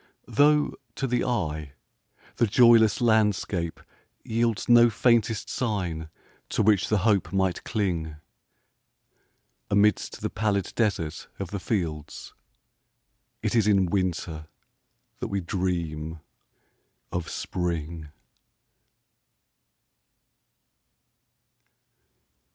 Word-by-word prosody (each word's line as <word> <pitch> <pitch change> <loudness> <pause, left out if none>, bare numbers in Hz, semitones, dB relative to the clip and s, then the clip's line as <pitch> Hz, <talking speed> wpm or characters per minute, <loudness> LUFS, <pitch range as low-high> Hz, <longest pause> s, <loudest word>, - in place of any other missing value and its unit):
Though, 150 +1 +3 0.2
to 135 - -2
the 125 -1 0
eye, 80 - -2 0.6
the 120 - +3
joyless 115 0 +5
landscape 105 -7 +1 0.5
yieldsNo 120 +1 +3
faintest 115 0 +2
sign 90 -9 -3 0.4
to - - +1
which 105 -1 +3
the 110 - +3
hope 100 -5 +2
might 95 -2 0
cling,—Amidst 95 +2 -4
the - - -2
pallid 100 -4 -1
desert 85 -8 -1
of 95 -3 -6
the 100 - -3
fields,—It 80 -8 -4 1.2
is 110 -3 +3
in 100 -3 +4
Winter 85 -5 -2 0.7
that - - -3
we 100 - -2
dream 85 -4 -3 0.9
of 90 -2 -3
Spring. 85 -3 -4
100 Hz, 80 wpm, -26 LUFS, 85-110 Hz, 1.2 s, joyless